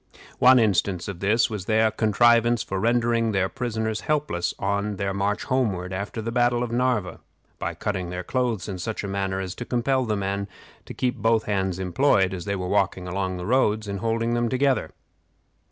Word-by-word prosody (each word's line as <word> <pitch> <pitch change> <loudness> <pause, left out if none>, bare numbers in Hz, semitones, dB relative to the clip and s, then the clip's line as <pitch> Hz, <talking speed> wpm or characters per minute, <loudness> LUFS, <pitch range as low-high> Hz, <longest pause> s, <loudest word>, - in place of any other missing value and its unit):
One 130 +1 +7
instance 100 -5 +1
of 100 -4 -6
this 105 +5 +3
was 105 -5 -5
their 110 0 +3
contrivance 115 +2 +3
for 95 - -3
rendering 115 0 +1
their 95 -1 +2
prisoners 110 -3 -3
helpless 145 - -1
on 100 +1 -1
their 100 0 -2
march 100 +1 -1
homeward 100 -9 -1
after 100 +4 -4
the 115 - -3
battle 120 0 +2
of 120 - -4
Narva, 120 -7 0 0.4
by - - -3
cutting 95 -4 -3
their 90 +1 -4
clothes 120 -2 -1
in 95 -3 -5
such 110 +5 -4
a - - -3
manner 95 -1 -2
as 95 -2 -4
to 125 - -6
compel 130 +2 0
the 105 -2 -1
men 100 0 -2 0.4
to - - -9
keep 125 0 -1
both 115 0 +2
hands 95 -3 -1
employed, 95 0 +2
as 90 -2 -5
they 100 0 -1
walked 95 +1 0
along 95 +1 -3
the 90 - -5
roads, 110 -2 +1
in 100 0 -3
holding 115 +2 -1
them 120 0 +1
together. 130 -1 +1
105 Hz, 185 wpm, -24 LUFS, 95-120 Hz, 0.4 s, One